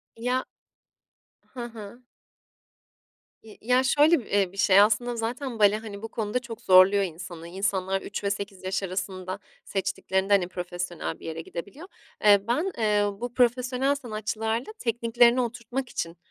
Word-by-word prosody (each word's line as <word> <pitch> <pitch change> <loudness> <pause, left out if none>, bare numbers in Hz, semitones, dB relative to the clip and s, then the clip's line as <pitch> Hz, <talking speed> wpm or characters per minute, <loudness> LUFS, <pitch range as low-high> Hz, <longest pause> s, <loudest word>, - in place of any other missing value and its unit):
Ya 250 +3 -1 1.0
Hı 245 -2 -7
hı. 230 0 -10 1.4
İ 215 -2 -14
ya, 250 +3 +3
şöyle, 295 +4 +4
bi - - -9
eee, 195 -3 +2
bir 195 - -15
şey 195 -1 +5
aslında 230 +3 +2
zaten 235 +1 -4
bale, 205 0 +5
hani, 215 -2 -8
bu 225 - -5
konuda 220 +1 -2
çok 240 -3 -9
zorluyor 190 +2 +6
insanı. 170 -1 -7
İnsanlar 190 +1 -1
3 205 - -6
ve 200 - +1
8 200 -1 -5
yaş 190 +1 -2
arasında 185 0 -4 0.3
seçtiklerinde, 190 0 -1
hani, 185 -3 +3
profesyonel 175 -2 -5
bir - - -12
yere 160 0 -4
gidebiliyor. 200 - -8 0.4
Eee, 205 -1 +7
ben, 315 +11 0
eee, 210 -2 +2 0.2
bu 245 0 -4
profesyonel 250 +3 +2
sanatçılarla 225 - -3
tekniklerini 235 +1 +3
oturtmak 240 +2 -4
için, 165 0 -4
215 Hz, 145 wpm, -26 LUFS, 190-245 Hz, 1.4 s, Eee